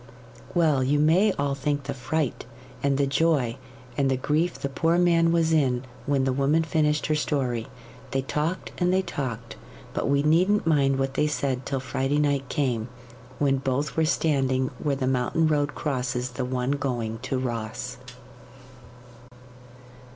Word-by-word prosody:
Well, 155 -6 +3
you 140 +3 +2
may 170 +8 +4
all 140 -1 -1
think 145 +1 -1
the 140 0 -4
fright, 135 0 -2 0.3
and 140 -1 +1
the 140 - +2
joy, 135 -4 +1 0.4
and 135 0 +1
the 130 - +1
grief 155 +6 0
the - - -3
poor 165 +5 +1
man 170 -1 +4
was 165 -1 +2
in 130 -5 +2 0.2
when 140 -2 +2
the 130 -1 +1
woman 140 +5 +2
finished 150 -1 +1
her 155 - +1
story. 130 -6 -1 0.4
They 135 +1 -1
talked 155 +6 -2
and 180 0 +2
they 190 +1 +2
talked, 120 -8 -5 0.4
but - - -1
we 140 0 +3
needn't 180 +7 +3
mind 140 -4 +3
what 135 0 -1
they 150 - +1
said 135 -3 -2
till 135 - -1
Friday 130 +3 -1
night 140 -3 +1
came, 125 -5 -1 0.5
when 135 -2 +2
both 135 +2 -1
were 160 - +2
standing 135 -5 +1
where 145 -2 0
the 135 -1 -2
mountain 130 +5 +1
road 150 -1 0
crosses 125 -3 -2
the 125 0 -3
one 125 +1 -1
going 120 -6 -2
to 130 +2 -2
Ross. 120 0 -4
140 Hz, 160 wpm, -25 LUFS, 130-155 Hz, 0.5 s, may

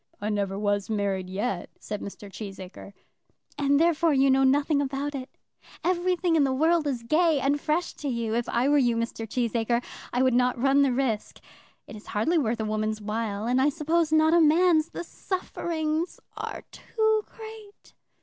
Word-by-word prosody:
"I 210 - -3
never 200 -2 -1
was 205 -1 -1
married 200 -3 -1
yet," 195 0 -3
said 210 -1 -6
Mr. 205 +1 -8
Cheesacre. 195 -1 -9 0.6
"And 285 -1 +2
therefore 330 -1 +3
you 270 0 +4
know 270 +1 +4
nothing 285 +2 +3
about 280 +1 -3
it. 260 -1 -6 0.5
Everything 360 -1 +1
in 305 - +4
the 270 - +1
world 320 +2 +2
is 250 -4 -2
gay 310 +4 +3
and 285 +2 0
fresh 325 +3 -1
to 295 - -5
you. 235 -4 -2
If 235 +1 -1
I 240 +3 +1
were 290 0 +4
you, 240 -3 +2
Mr. 230 -1 -3
Cheesacre, 235 0 0 0.3
I 250 +1 +1
would 260 -1 +3
not 250 +1 +2
run 275 +2 +4
the 275 -2 +3
risk. 245 -4 -2 0.5
It - - -10
is 210 - -12
hardly 320 +12 +1
worth 235 -4 -1
a 220 - -1
woman's 215 0 -1
while, 210 0 -3
and 250 +2 +2
I 280 - +4
suppose 320 +2 0
not 315 +1 +4
a 340 - +6
man's. 320 0 +4
The - - -6
sufferings 335 -3 -3 0.2
are - - -6
too 440 -1 0
great!" 440 -2 -12
270 Hz, 180 wpm, -26 LUFS, 220-315 Hz, 0.6 s, a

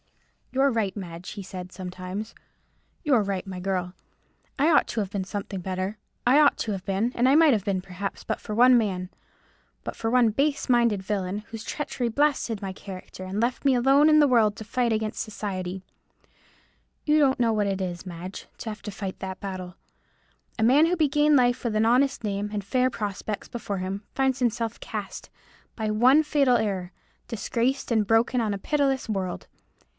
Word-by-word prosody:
"You're 270 +1 +3
right, 220 -4 -1
Madge," 175 -2 -7
he 200 - -7
said 185 -1 -8
sometimes, 185 +3 -6 0.7
"you're 270 -8 +4
right, 195 -2 -2
my 190 -2 -6
girl. 180 -1 -2 0.7
I 300 +4 +4
ought 310 - +4
to 230 - -2
have 200 -2 -2
been 200 -2 -2
something 195 -1 -5
better; 185 +3 -3 0.3
I 265 +4 +6
ought 295 -1 +5
to 220 - -2
have 190 -2 -5
been, 200 +6 0
and 250 +2 +3
I 275 - +5
might 315 -3 +6
have 210 -4 0
been, 195 -2 -1
perhaps, 195 +1 -6
but - - -3
for 215 - -5
one 250 +2 +7
man—but 190 -4 -6
for 225 - -2
one 240 -2 +4
base 280 +5 0
minded 235 -6 +3
villain, 195 -1 -2
whose 225 -1 -7
treachery 270 -4 -3
blasted 265 -5 +1
my 195 -1 -4
character, 185 -1 -9
and 190 +2 -4
left 240 +2 0
me 275 -2 +4
alone 270 +5 +5
in 305 0 +6
the 295 - +6
world 225 -5 +3
to 220 - -7
fight 245 +1 0
against 220 -1 -1
society. 190 -4 -4 1.2
You 305 0 +4
don't 270 -3 +3
know 230 -2 +3
what 210 -2 +1
it 195 -1 -1
is, 180 -1 -4
Madge, 180 +1 -8
to 225 - -6
have 215 - -7
to 210 - -6
fight 195 -2 -6
that 190 0 -5
battle. 185 -2 -6 0.8
A - - +2
man 280 +8 +6
who 355 +1 0
began 300 -1 +3
life 245 0 +2
with 230 -3 -1
an 220 - +3
honest 255 +3 +2
name, 205 0 -2
and 205 -1 -3
fair 255 +6 +1
prospects 210 -2 -4
before 210 -4 -4
him, 190 +2 -4
finds 265 -1 +1
himself 235 -2 -1
cast, 210 -3 -6 0.5
by 215 -2 -1
one 255 +8 +5
fatal 280 -5 +3
error, 190 -4 -2 0.4
disgraced 240 +4 -1
and 220 -2 +3
broken, 230 +3 +3
on 215 -2 0
a - - -2
pitiless 275 +3 0
world. 190 -4 -3
215 Hz, 190 wpm, -26 LUFS, 195-255 Hz, 1.2 s, one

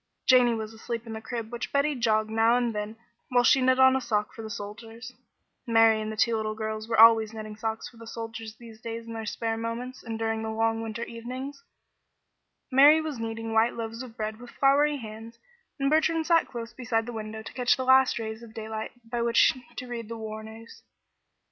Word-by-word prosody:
Janey 250 -2 +5
was 220 0 -5
asleep 230 +1 -5
in 225 - -7
the 220 - -6
crib 230 -1 -5
which 240 0 -5
Betty 285 +2 +2
jogged 220 -4 +1
now 225 +2 +4
and 240 -2 0
then 210 +1 -4 0.3
while 245 -1 +3
she 265 +2 +5
knit 255 0 +3
on 260 0 +7
a 265 - 0
sock 210 -3 -1
for - - -8
the 220 - -7
soldiers, 225 +4 -8 0.5
Mary 225 -1 +5
and 215 0 -4
the 220 - -7
two 230 +1 +3
little 215 -1 -2
girls 220 0 -4
were 225 - +1
always 225 -1 +7
knitting 215 -1 -7
socks 220 0 -3
for 235 - -16
the 230 0 -11
soldiers 225 -1 -7
these 225 -2 -14
days 230 0 -6
in 230 - -8
their 225 -1 -5
spare 225 +1 -2
moments 235 +3 -5
and 225 -2 -5
during 225 0 -1
the 220 - -3
long 225 0 0
winter 225 +1 -4
evenings, 255 - -7 1.1
Mary 285 +4 +7
was 310 -6 -4
kneading 225 0 -4
white 225 +1 +3
loaves 230 0 -5
of 240 -3 -10
bread 215 0 -4
with 245 0 -11
floury 285 +3 +3
hands, 225 -1 -9 0.4
and 275 +1 +1
Bertrand 320 +1 +2
sat 335 0 +3
close 235 -2 -7
beside 230 -2 -1
the 240 - -6
window 220 0 -6
to - - -9
catch 250 -2 +2
the 260 - -3
last 260 -1 +5
rays 220 0 -5
of 230 -2 -13
daylight 220 0 -5
by 235 +1 -3
which 235 0 +4 0.2
to 255 - -5
read 235 -3 -6
the 230 - -5
war 220 -1 -6
news. 220 +1 -12
230 Hz, 215 wpm, -27 LUFS, 220-245 Hz, 1.1 s, on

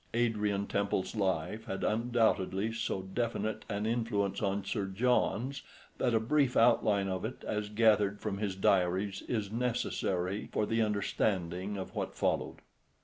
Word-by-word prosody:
Adrian 105 -4 +1
Temple's 100 0 -1
life 95 +1 -1
had 95 -4 -4
undoubtedly 110 -3 +1
so 110 -4 -2
definite 110 +1 -2
an 105 0 -2
influence 110 -4 0
on 100 -1 -1
Sir 100 -2 -2
John's 125 +5 +1 0.4
that 120 -2 +2
a - - +4
brief 135 +3 +2
outline 105 -4 +4
of 95 -1 -2
it, 110 +4 -5
as 105 -1 -2
gathered 105 -2 +3
from 100 -2 -3
his 100 -3 -2
diaries, 95 +1 +1
is 105 -4 -2
necessary 105 -5 -1
for 105 - +1
the 115 +2 +1
understanding 100 -2 -1
of 95 - -6
what - - -3
followed. - - -1
105 Hz, 145 wpm, -32 LUFS, 95-115 Hz, 0.4 s, a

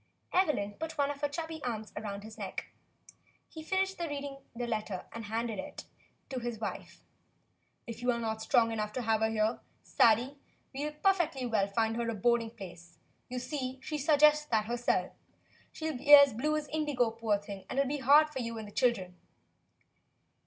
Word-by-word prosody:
Evelyn 295 - +2
put 320 -1 -5
one 285 0 +2
of 280 - -8
her 290 - +1
chubby 320 +1 -5
arms 220 -3 -4
around 205 -1 -5
his 220 0 -10
neck. - - -6 0.8
He 320 - -9
finished 385 +3 -1
reading 285 -4 -4 0.2
the 245 +1 -3
letter 215 -5 -3
and 230 -1 -7
handed 225 -1 -2
it - - -7 0.4
to 260 - -3
his 240 -1 -4
wife. 220 0 -6 0.8
"If 230 -1 -7
you 245 0 +2
are 235 - -1
not 220 -1 -3
strong 230 -1 +3
enough 210 -1 -3
to 255 - -3
have 220 -1 +1
her 220 - +3
here, 220 +1 0 0.2
Sadie, 245 +5 +3 0.3
we 280 +2 -3
can 300 - -14
perfectly 345 -9 +2
well 215 -5 +1
find 225 +2 0
her 235 -1 -1
a 230 - -2
boarding 230 +2 +2
place. 175 -6 -11 0.3
You 250 - -4
see, 260 0 -4
she 305 -1 -3
suggests 300 +1 +5
that 220 -4 +1
herself. 240 +1 0 0.6
She'll 315 -2 -4
be 285 +4 0
as 280 -3 +7
blue 300 +7 0
as 300 -1 -4
indigo, 290 -7 0
poor 225 -2 0
thing, 200 -2 -9
and - - -4
it 275 - +5
'11 - - -3
be 295 - -1
too - - -9
hard 300 +3 +7
for 270 - -4
you 230 -2 -4
and 220 -1 -6
the - - -11
children." 190 -8 +1
240 Hz, 195 wpm, -31 LUFS, 220-290 Hz, 0.8 s, as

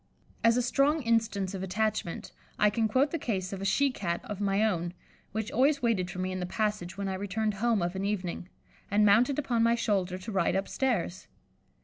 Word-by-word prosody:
As 230 +1 +5
a 250 - +2
strong 285 +5 +2
instance 220 -4 +1
of 190 - -4
attachment, 210 -1 -2 0.3
I 210 0 +4
can 220 +1 +1
quote 260 +7 +2
the 330 - -2
case 195 -7 -2
of 195 - -5
a - - -3
she 275 +8 +3
Cat 175 -7 -2
of 205 -1 -6
my 200 +1 +2
own, 175 -4 -1 0.4
which 220 0 -3
always 275 +2 +2
waited 200 -7 +1
for 175 - -7
me 185 0 -2
in 185 - -3
the 180 - -3
passage 210 -3 -2
when 200 -1 -2
I 190 - -2
returned 205 +3 -1
home 215 -1 +1
of 175 +2 -2
an 190 - -2
evening, 185 -3 -3 0.4
and 210 +1 +4
mounted 235 +7 +4
upon 250 -6 0
my 230 +1 +4
shoulder 190 -5 0
to 195 +4 -7
ride 190 -3 +1
upstairs. 195 -2 -1
205 Hz, 210 wpm, -29 LUFS, 185-230 Hz, 0.4 s, As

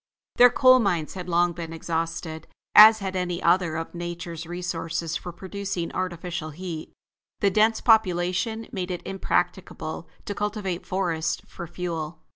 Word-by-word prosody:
Their 245 0 +9
coal 255 +1 +6
mines 175 -8 0
had 180 -1 -7
long 175 0 +2
been 165 -1 -6
exhausted, 165 -1 -4 0.3
as 220 +1 +10
had 195 -3 -4
many 180 -2 -2
other 170 -2 +2
of 165 +1 -5
nature's 170 -1 -6
resources 170 -2 -3
for 175 - -5
producing 190 -1 -4
artificial 175 -3 -3
heat. 165 0 -7 0.5
The 200 - +3
dense 220 +3 +3
population 220 +1 +2
made 185 -2 -4
it 180 -1 -5
impracticable 175 -3 -2 0.2
to 205 - -3
cultivate 200 -3 -3
forests 170 -4 -1
for 170 - -8
fuel. 165 -2 -5
175 Hz, 140 wpm, -25 LUFS, 165-195 Hz, 0.5 s, as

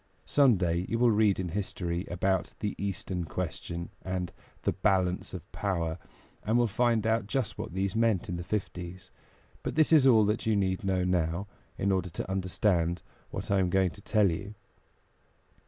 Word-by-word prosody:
Some 135 -7 +5
day 85 0 0
you 115 - 0
will 120 0 +4
read 105 -2 +3
in 90 -2 -2
history 90 -1 -3
about 95 +2 0
the 105 -2 -2
Eastern 95 -2 -2
Question 85 0 -4
and 90 -1 -3 0.3
the - - +2
Balance 95 -3 +1
of - - -6
Power, 85 -4 -2 0.4
and 110 +3 +2
will 120 - +4
find 115 0 +1
out 110 -2 +1
just 130 -1 -2
what - - -5
these 95 +1 -1
meant 110 -5 +2
in 90 - -3
the 85 - -4
Fifties; 90 -2 -5 0.5
but - - -4
this 160 +1 +4
is 145 -4 +7
all 110 -5 +6
that 105 +2 -1
you 110 - +3
need 95 -2 0
know 95 -1 +1
now, 90 0 0 0.3
in 100 - +1
order 95 -2 0
to 85 - -5
understand 90 -2 +1 0.3
what - - -5
I 100 - +4
am 90 -1 +2
going 95 -1 +2
to 100 - -13
tell 105 -3 +3
you. 100 +5 -5
95 Hz, 180 wpm, -29 LUFS, 90-105 Hz, 0.5 s, is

